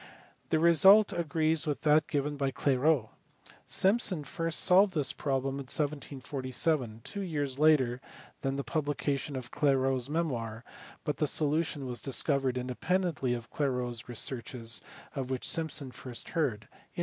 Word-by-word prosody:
The - - +2
result 190 +6 +6
agrees 160 -1 0
with 145 - -2
that 155 0 +4
given 145 -2 -1
by 140 -1 0
Clairaut. 135 -2 +1 0.6
Simpson 190 -5 +2
first 165 +1 -2
solved 190 +1 +5
this 145 -4 +1
problem 135 -1 -2
in 140 - -6
1747, 135 -3 -2
two 200 - -5
years 145 -7 -3
later 130 -6 +3 0.4
than 135 0 -1
the 140 - -2
publication 145 -1 -2
of 125 -2 -6
Clairaut 135 -2 +2
s 125 - -7
memoir, 120 -9 -2 0.4
but 150 -4 -2
the 150 - +1
solution 150 -1 +1
was 125 -2 -4
discovered 135 -1 0
independently 135 +1 -1
of 120 -1 -9
Clairaut 125 -4 -1
s 120 +1 -7
researches 120 -1 -4 0.3
of 135 -2 -3
which 130 -1 -2
Simpson 155 -5 0
first 125 -1 -6
heard 140 -11 0
in - - -27
1748. - - -4
140 Hz, 150 wpm, -30 LUFS, 130-160 Hz, 0.6 s, result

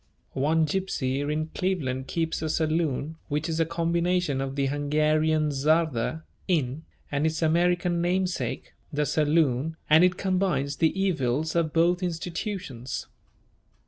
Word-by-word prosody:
One 155 +4 +2
gypsy 145 -6 -1
in 155 +1 -2
Cleveland 140 -9 -2
keeps 165 -1 -2
a 160 - -2
saloon 155 -1 0
which 150 +2 -1
is 165 -1 -2
a 165 - +2
combination 170 -3 0
of 135 0 -3
the 140 -1 +1
Hungarian 155 +2 +1
"czarda" 155 0 +1 0.2
(inn) 155 -4 0 0.3
and 145 +2 +1
its 160 +1 -1
American 175 +1 +2
namesake, 180 +1 -1 0.2
the 150 0 0
saloon, 155 -1 +1
and 160 +3 +8
it 180 0 +3
combines 185 -7 0
the 165 +4 +1
evils 155 -5 0
of 165 -2 +1
both 175 +3 +2
institutions. 170 - -4
160 Hz, 130 wpm, -26 LUFS, 145-170 Hz, 0.3 s, and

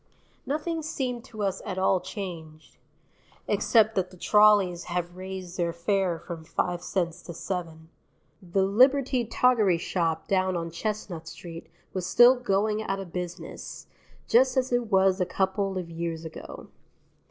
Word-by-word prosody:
Nothing 320 +3 -2
seemed 260 -6 -3
to 215 -5 -6
us 195 -2 -1
at 185 - -5
all 190 0 +3
changed 165 -5 -8 0.7
except 220 -2 +3
that 185 -3 0
the 185 - -15
trolleys 205 -3 +4
have 175 0 -3
raised 185 -1 -7
their 170 -2 0
fare 175 +1 0
from 165 0 -8
five 175 +2 -2
cents 175 -2 -2
to 170 - -9
seven. 165 -3 -5 0.5
The 190 +1 0
Liberty 255 +4 +3
Toggery 220 -6 +3
Shop 165 -2 -1
down 185 -2 +1
on 165 0 -4
Chestnut 175 -3 -4
Street 165 -1 -9 0.2
was 185 -1 -3
still 240 +5 +7
"Going 215 -3 0
Out 195 -2 -2
of 190 -3 -8
Business," 180 0 -6 0.4
just 260 +3 +4
as 255 -1 +1
it 245 -1 +1
was 190 0 +4
a - - +3
couple 190 +1 -1
of 175 -2 -5
years 165 -1 -4
ago. 160 - -9
190 Hz, 150 wpm, -27 LUFS, 170-215 Hz, 0.7 s, still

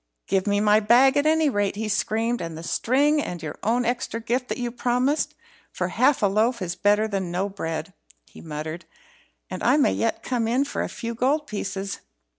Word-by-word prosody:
"Give 195 +1 0
me 205 0 +2
my 210 0 +4
bag, 245 +6 +5
at 290 +1 +2
any 315 0 +3
rate," 205 -7 0
he 220 +1 -3
screamed, 225 +2 0
"and 165 -2 -5
the 165 - -8
string 290 - +2
and 175 - -5
your 150 - -6
own 240 +3 +1
extra 240 -1 -2
gift 245 +3 -1
that - - -2
you 245 -2 -3
promised. 250 +4 0 0.4
For - - -2
half 260 -2 +2
a - - +6
loaf 220 +5 +2
is 175 -2 -3
better 205 +3 +2
than 195 -4 -2
no 180 +3 -1
bread," 165 -5 -5 0.3
he - - -14
muttered, 155 +1 -6 0.7
"and - - -5
I - - +4
may 290 - +3
yet 230 - -1
come 240 -3 -1
in 255 +5 +2
for - - -3
a - - -2
few 235 -1 -5
gold 275 +6 +1
pieces." 200 -3 -4
225 Hz, 205 wpm, -24 LUFS, 195-250 Hz, 0.7 s, a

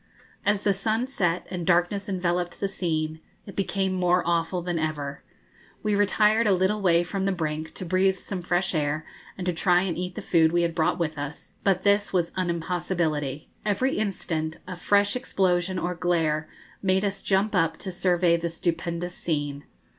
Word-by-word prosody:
As 205 0 +1
the 200 - +3
sun 220 +5 0
set, 180 -10 0
and 180 -2 -3
darkness 180 +4 +2
enveloped 180 -2 -1
the 200 - 0
scene, 160 -4 -2 0.3
it 195 - -10
became 195 -1 0
more 180 -1 +2
awful 170 +1 0
than 175 -1 -1
ever. 150 -3 -3 0.6
We 210 -1 +1
retired 210 +2 +3
a 200 - +5
little 190 +3 +1
way 175 -3 +4
from 190 +2 -2
the 195 - +2
brink, 155 -3 -3
to 185 - -4
breathe 190 +2 +2
some 185 0 -5
fresh 175 +2 0
air, 155 0 0 0.3
and 185 - -4
to 180 - +1
try 180 +2 +3
and 185 -3 -1
eat 180 0 -4
the - - -5
food 160 -2 +4
we 175 0 +2
had 170 -1 0
brought 160 -1 +1
with 160 -4 -2
us; 145 +1 -7
but 190 -2 +2
this 205 0 +3
was 175 -3 +1
an 185 -2 0
impossibility. 165 -4 -2
Every 215 +6 +1
instant 165 -6 -2
a 185 - -6
fresh 200 +3 +2
explosion 185 -6 +1
or 180 0 -1
glare 165 -3 0 0.3
made 190 +1 +2
us 195 -1 -2
jump 200 +2 +1
up 165 -3 +2
to 190 - -5
survey 175 -1 +2
the 170 0 -2
stupendous 170 +1 -2
scene. 145 -4 -2
180 Hz, 185 wpm, -26 LUFS, 165-195 Hz, 0.6 s, a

